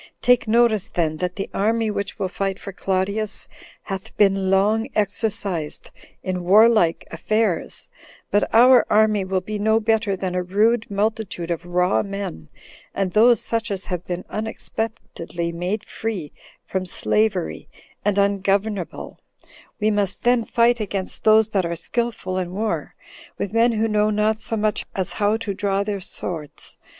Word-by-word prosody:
Take 245 -2 +4
notice, 220 -2 +3
then, 155 -3 -1
that 180 +2 -3
the 195 - -3
army 220 +2 +1
which 200 -1 -4
will 190 - -1
fight 195 +1 -2
for 200 - -8
Claudius 195 +3 -2 0.4
hath 195 -2 -7
been 195 -2 +3
long 210 +4 +2
exercised 200 -6 -2 0.3
in 185 -1 -2
warlike 205 -2 +5
affairs; 210 +2 -1 0.4
but 205 - +3
our 245 +2 +7
army 215 -1 +3
will 185 0 -1
be 210 +3 -5
no 220 +2 +3
better 220 -2 +1
than 185 -1 -3
a 180 - 0
rude 215 +6 +1
multitude 200 -4 -2
of 170 +1 -4
raw 180 +1 +2
men, 195 - -6 0.5
and 195 -2 0
those 230 +4 +5
such 230 0 -2
as 195 -1 -3
have 180 -2 -4
been 180 0 -4
unexpectedly 215 -6 -4
made 180 +6 -3
free 200 -10 -4 0.3
from 190 -1 -2
slavery, 195 0 -1 0.3
and 205 -1 +1
ungovernable; 200 -1 0 0.6
we 215 0 +2
must 200 -2 -1
then 245 -1 +3
fight 235 +1 +2
against 195 -3 -4
those 220 0 +6
that 195 -3 +1
are 170 0 -2
skillful 230 -2 -2
in 180 -1 -4
war, 215 +2 -2 0.4
with 200 - -4
men 230 +1 +4
who 220 0 +1
know 210 -1 +2
not 215 +1 +1
so 225 - -2
much 215 0 0
as 190 -2 -2
how 210 +1 +1
to 225 -3 -4
draw 200 0 0
their 200 -1 -3
swords. 165 -5 -6
205 Hz, 155 wpm, -22 LUFS, 185-220 Hz, 0.6 s, our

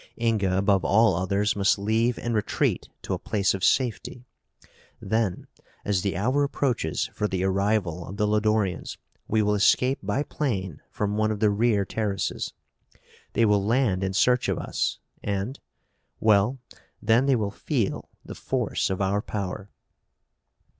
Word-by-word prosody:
Inga, 105 -5 +1
above 100 -1 +2
all 110 -2 +4
others, 100 +4 0
must 100 0 +3
leave 110 +4 +1
and 120 - -3
retreat 105 -2 0
to - - -3
a - - -2
place 100 -2 0
of 95 -1 -5
safety. 125 0 0 0.7
Then, 110 -5 -1 0.4
as 100 -3 +1
the 100 -2 -2
hour 130 +9 +1
approaches 125 - -1
for 105 - -1
the 95 -2 -2
arrival 95 -3 0
of 100 - -8
the 105 - +2
Lodorians, 105 -2 0 0.3
we 110 0 +2
will 105 0 +2
escape 125 +6 +3
by 105 +8 -1
plane 95 - -3
from 105 0 -2
one 110 0 +2
of 105 -1 -2
the 105 -1 +3
rear 105 -1 +2
terraces. 100 -2 -2 0.8
They 115 - +3
will 105 -2 +3
land 110 -4 +1
in 95 0 -1
search 125 +5 +3
of - - 0
us - - -2 0.2
and 100 +6 -3 0.6
well, 110 +4 +3 0.4
then 120 +5 +3
they 135 - +4
will 105 -4 -1
feel 115 -2 -2 0.2
the - - -7
force - - -1
of 95 0 -2
our 100 +2 +1
power." 100 -1 -5
105 Hz, 155 wpm, -25 LUFS, 100-115 Hz, 0.8 s, all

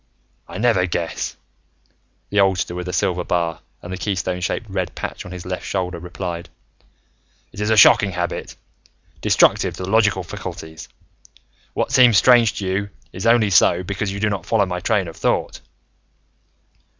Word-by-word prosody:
"I - - -8
never 110 -4 +2
guess," 85 -1 -3 0.9
the 105 - +1
oldster 95 -2 +2
with 90 0 -5
the - - -3
silver 90 0 0
bar 85 -2 -1 0.2
and 90 - -7
the 95 - -6
keystone 90 -3 -2
shaped 100 +4 -2
red 95 -3 -3
patch - - -6
on - - -10
his 90 -1 -8
left 90 0 -4
shoulder 90 -3 -3
replied. 85 0 -6 1.0
"It - - -11
is 105 - 0
a 110 - +3
shocking 105 0 +7
habit 90 0 -4 0.7
destructive - - +3
to - - -6
the 95 - -4
logical 105 -4 +3
faculties. 80 -1 -8 0.9
What - - -1
seems 125 -5 +6
strange 115 +1 +5
to 100 - -4
you 95 +2 -2 0.2
is 95 +5 -3
only 115 -3 +4
so 90 -1 +4
because 100 +2 -3
you 100 - -5
do 105 0 +1
not 100 - -4
follow 110 -3 +2
my 90 -1 -4
train 95 0 0
of 80 - -9
thought. - - -1
95 Hz, 165 wpm, -20 LUFS, 90-105 Hz, 1.0 s, shocking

